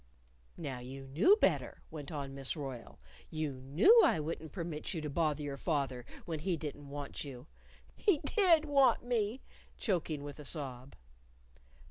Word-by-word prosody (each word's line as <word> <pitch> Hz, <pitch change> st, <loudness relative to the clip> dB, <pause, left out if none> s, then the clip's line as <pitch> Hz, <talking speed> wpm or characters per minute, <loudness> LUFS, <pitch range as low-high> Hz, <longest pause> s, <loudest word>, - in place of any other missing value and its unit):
"No, 135 Hz, -4 st, -4 dB
you 135 Hz, +2 st, -8 dB
knew 165 Hz, -, +5 dB
better," -, -, +1 dB
went 145 Hz, -3 st, -7 dB
on 140 Hz, -3 st, -4 dB
Miss 135 Hz, +3 st, -3 dB
Royle. 135 Hz, -5 st, -7 dB, 0.3 s
"You 150 Hz, -5 st, -3 dB
knew 175 Hz, -, +6 dB
I -, -, +4 dB
wouldn't 160 Hz, 0 st, -4 dB
permit 170 Hz, -1 st, -4 dB
you 160 Hz, -, -2 dB
to 150 Hz, -1 st, -4 dB
bother 155 Hz, -1 st, +1 dB
your 140 Hz, -1 st, -4 dB
father 135 Hz, -6 st, -1 dB, 0.2 s
when 160 Hz, -2 st, -3 dB
he 170 Hz, +2 st, 0 dB
didn't 145 Hz, -2 st, -6 dB
want 145 Hz, 0 st, -5 dB
you 130 Hz, -3 st, -8 dB, 0.2 s
" -, -, -26 dB
"He 400 Hz, -7 st, +3 dB
did 345 Hz, -7 st, +4 dB
want 275 Hz, -4 st, +4 dB
me!" 240 Hz, 0 st, 0 dB, 0.4 s
choking 165 Hz, -8 st, -1 dB
with 145 Hz, 0 st, -8 dB
a -, -, -7 dB
sob. 135 Hz, -3 st, -5 dB
150 Hz, 160 wpm, -34 LUFS, 140-175 Hz, 0.4 s, knew